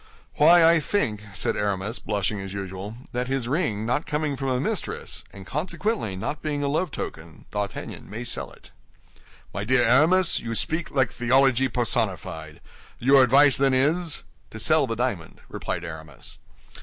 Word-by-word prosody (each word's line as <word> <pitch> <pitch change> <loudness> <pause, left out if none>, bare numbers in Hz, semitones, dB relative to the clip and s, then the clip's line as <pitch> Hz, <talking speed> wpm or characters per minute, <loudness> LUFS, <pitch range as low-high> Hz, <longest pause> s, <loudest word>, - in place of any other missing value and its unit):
"Why, 165 +3 +7
I 165 0 +5
think," 130 - -1
said - - 0
Aramis, 100 +2 -2
blushing 100 -1 -2
as 95 0 -7
usual, 100 +2 -6 0.2
"that 125 +1 -2
his 135 -2 -2
ring 120 - -1
not 125 +6 -1
coming 150 -1 -1
from 135 0 -4
a 130 -1 0
mistress, 135 - -3
and 95 -1 -11
consequently 150 - -2
not 140 +10 -4
being 145 -2 -2
a - - 0
love 155 +5 0
token, 80 - -8
D'Artagnan 100 -3 -5
may 110 +4 -5
sell 120 - -3
it." - - -17 0.8
"My 100 - -3
dear 125 +3 +3
Aramis, 165 +9 +4
you 115 0 -4
speak 160 +7 -1
like 130 -4 +1
theology 130 +2 +3
personified. 90 -10 -2 0.4
Your 135 +2 +5
advice, 135 +2 +6
then, 135 -1 +3
is—" 160 +5 +1 0.3
"To 110 - -9
sell 155 +4 +3
the 115 - -2
diamond," 115 -8 -3
replied 85 - -4
Aramis. 80 -5 -10
125 Hz, 160 wpm, -25 LUFS, 100-145 Hz, 0.8 s, Why